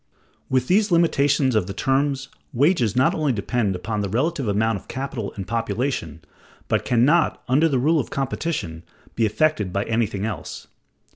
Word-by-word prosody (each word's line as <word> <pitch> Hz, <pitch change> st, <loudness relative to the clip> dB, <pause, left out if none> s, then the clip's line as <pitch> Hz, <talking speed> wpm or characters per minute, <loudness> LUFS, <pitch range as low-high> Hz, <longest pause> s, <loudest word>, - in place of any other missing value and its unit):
With 130 Hz, -1 st, +1 dB
these 205 Hz, +3 st, +3 dB
limitations 145 Hz, -6 st, +3 dB
of 105 Hz, -5 st, +1 dB
the 95 Hz, -, -6 dB
terms, 135 Hz, +1 st, 0 dB, 0.3 s
wages 125 Hz, -, +2 dB
not 130 Hz, +1 st, +3 dB
only 150 Hz, -3 st, 0 dB
depend 105 Hz, -1 st, -1 dB
upon 105 Hz, +3 st, -3 dB
the 100 Hz, -, -2 dB
relative 135 Hz, -, -1 dB
amount 105 Hz, +1 st, +1 dB
of -, -, -22 dB
capital 130 Hz, -6 st, -4 dB
and 95 Hz, -2 st, -6 dB
population, 115 Hz, -, -2 dB, 0.5 s
but -, -, 0 dB
can 120 Hz, 0 st, +3 dB
not, 165 Hz, +3 st, +2 dB
under 150 Hz, +6 st, +3 dB
the 135 Hz, -, +1 dB
rule 155 Hz, +6 st, +2 dB
of 130 Hz, -, -3 dB
competition, 135 Hz, -, -3 dB, 0.3 s
be 115 Hz, -1 st, +1 dB
affected 105 Hz, -, 0 dB
by 100 Hz, +2 st, -1 dB
anything 110 Hz, -3 st, -1 dB
else. 105 Hz, -8 st, -6 dB
125 Hz, 165 wpm, -23 LUFS, 105-145 Hz, 0.5 s, these